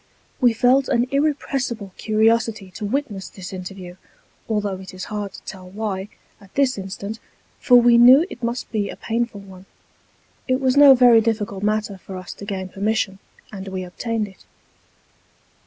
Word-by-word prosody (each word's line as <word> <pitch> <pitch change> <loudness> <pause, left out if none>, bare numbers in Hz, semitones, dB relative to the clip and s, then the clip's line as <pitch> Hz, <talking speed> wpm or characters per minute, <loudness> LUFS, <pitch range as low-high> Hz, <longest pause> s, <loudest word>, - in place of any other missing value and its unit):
We 245 -3 +4
felt 250 +4 +3
an 240 +1 +2
irrepressible 270 -8 -1
curiosity 220 -2 +1
to 205 - -6
witness 215 -4 -3
this 190 -1 -9
interview, 185 -1 -8 0.5
although 205 -3 -1
it 190 0 -10
is 185 - -6
hard 205 -2 -3
to - - -12
tell 185 -2 -9
why, 200 -1 -4 0.3
at 195 -1 -19
this 275 -2 +2
instant, 200 +3 -6 0.4
for 250 - +4
we 240 0 +5
knew 260 +7 +8
it 250 - -11
must 235 +1 -3
be 210 -3 -1
a - - -7
painful 230 -2 -3
one. 190 -1 -14 0.8
It 255 -1 +1
was 260 -1 +1
no 285 -1 +9
very 245 -2 +6
difficult 210 -3 -2
matter 210 -1 -1
for 190 - -9
us 185 -1 -8
to 200 - -10
gain 190 -2 -4
permission, 200 0 -1 0.3
and 195 -2 -8
we 190 -1 -4
obtained 220 +4 -3
it. 195 - -17
215 Hz, 165 wpm, -22 LUFS, 195-240 Hz, 0.8 s, no